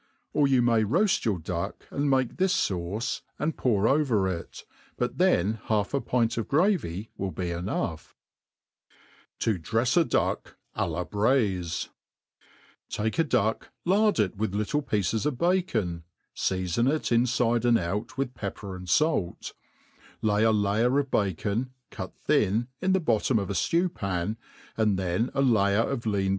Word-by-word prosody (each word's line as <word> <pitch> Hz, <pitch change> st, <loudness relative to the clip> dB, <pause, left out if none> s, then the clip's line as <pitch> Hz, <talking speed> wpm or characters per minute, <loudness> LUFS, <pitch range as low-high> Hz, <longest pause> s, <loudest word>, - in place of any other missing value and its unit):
Or 145 Hz, -2 st, +3 dB
you 130 Hz, -3 st, +3 dB
may 115 Hz, -2 st, +3 dB
roaft 175 Hz, -, +2 dB
your 105 Hz, -5 st, +1 dB
duck, 85 Hz, +1 st, -4 dB
and 140 Hz, 0 st, 0 dB
make 130 Hz, -3 st, +1 dB
this 185 Hz, -, +2 dB
(auce, 95 Hz, +7 st, -3 dB, 0.2 s
and 155 Hz, 0 st, -1 dB
pour 105 Hz, -6 st, +1 dB
nver 115 Hz, -8 st, +2 dB
it -, -, -13 dB
i -, -, -41 dB, 0.3 s
but -, -, -2 dB
then 105 Hz, +6 st, +2 dB
half 105 Hz, 0 st, 0 dB
a 140 Hz, -, +1 dB
pint 115 Hz, -2 st, 0 dB
of 115 Hz, -, -3 dB
gravy 140 Hz, -, +1 dB
will 95 Hz, -, -2 dB
be 90 Hz, -1 st, -3 dB
enough* 85 Hz, -2 st, -3 dB, 1.2 s
Tc 110 Hz, -5 st, 0 dB
drefs 115 Hz, +9 st, +1 dB
a 170 Hz, -, +6 dB
Duck -, -, -1 dB, 0.2 s
a -, -, -1 dB
la 85 Hz, +2 st, -3 dB
Braifi* 100 Hz, -7 st, 0 dB, 1.0 s
Take 110 Hz, +7 st, -2 dB
a -, -, +6 dB
duck, 110 Hz, -7 st, 0 dB, 0.2 s
lard 205 Hz, +4 st, +3 dB
it 100 Hz, -4 st, +1 dB
with 105 Hz, -1 st, -2 dB
little 105 Hz, +9 st, 0 dB
pieces 110 Hz, -1 st, 0 dB
of 140 Hz, -4 st, -2 dB
bacon, 120 Hz, -, 0 dB, 0.3 s
feafon 95 Hz, +7 st, 0 dB
it 155 Hz, -4 st, -2 dB
infide 120 Hz, -1 st, +2 dB
and 120 Hz, -1 st, +4 dB
out 105 Hz, +10 st, -3 dB
with 135 Hz, -2 st, -2 dB
pepper 100 Hz, -3 st, -6 dB
and 90 Hz, -1 st, -9 dB
fait; 150 Hz, -, +1 dB, 0.7 s
lay 105 Hz, 0 st, +2 dB
a 110 Hz, -, +5 dB
layer 110 Hz, +5 st, +2 dB
of 140 Hz, -2 st, 0 dB
bacon, 105 Hz, +6 st, -1 dB, 0.2 s
cut -, -, -7 dB
thin,' 110 Hz, +5 st, +1 dB
in 190 Hz, 0 st, +2 dB
the 190 Hz, -, +3 dB
bottom 120 Hz, -, +1 dB
of 100 Hz, -2 st, -2 dB
a -, -, -1 dB
ftew 170 Hz, -, +1 dB
pan, 100 Hz, +2 st, -2 dB, 0.4 s
and 105 Hz, -3 st, +2 dB
then 95 Hz, +6 st, 0 dB
a 135 Hz, -, +2 dB
layer 105 Hz, -4 st, +3 dB
of 120 Hz, -4 st, -3 dB
lean 100 Hz, -2 st, +1 dB
110 Hz, 160 wpm, -27 LUFS, 95-135 Hz, 1.2 s, a